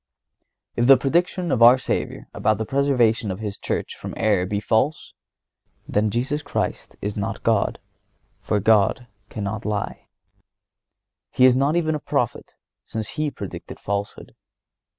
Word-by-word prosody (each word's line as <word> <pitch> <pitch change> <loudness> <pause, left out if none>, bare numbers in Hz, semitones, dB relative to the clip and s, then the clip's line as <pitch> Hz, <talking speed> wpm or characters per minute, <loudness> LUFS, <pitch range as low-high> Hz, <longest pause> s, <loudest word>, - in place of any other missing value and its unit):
If 120 0 +2
the 135 -1 +9
prediction 175 +3 0
of 125 - +1
our 120 +2 +9
Savior 130 - -3
about 110 0 +1
the 110 - -3
preservation 125 -5 +2
of 95 - -3
His 105 -2 -4
Church - - -3
from - - -8
error 100 -5 +2
be 100 +1 -1
false, 110 +8 0 0.7
then 105 +1 +1
Jesus 130 +7 -1
Christ 145 - -3
is 105 0 -2
not 100 -2 -4
God, - - +1 0.6
since 105 -2 -1
God 110 +3 +3 0.2
cannot 105 +1 -4
lie. 105 -1 -3 1.2
He 130 - +4
is 130 -1 +6
not 140 +4 +2
even 160 -2 +1
a 150 - -2
prophet, - - -2 0.3
since 110 -2 -5
He 155 -1 -2
predicted - - -8
falsehood. 100 0 -4
115 Hz, 145 wpm, -23 LUFS, 105-140 Hz, 1.2 s, the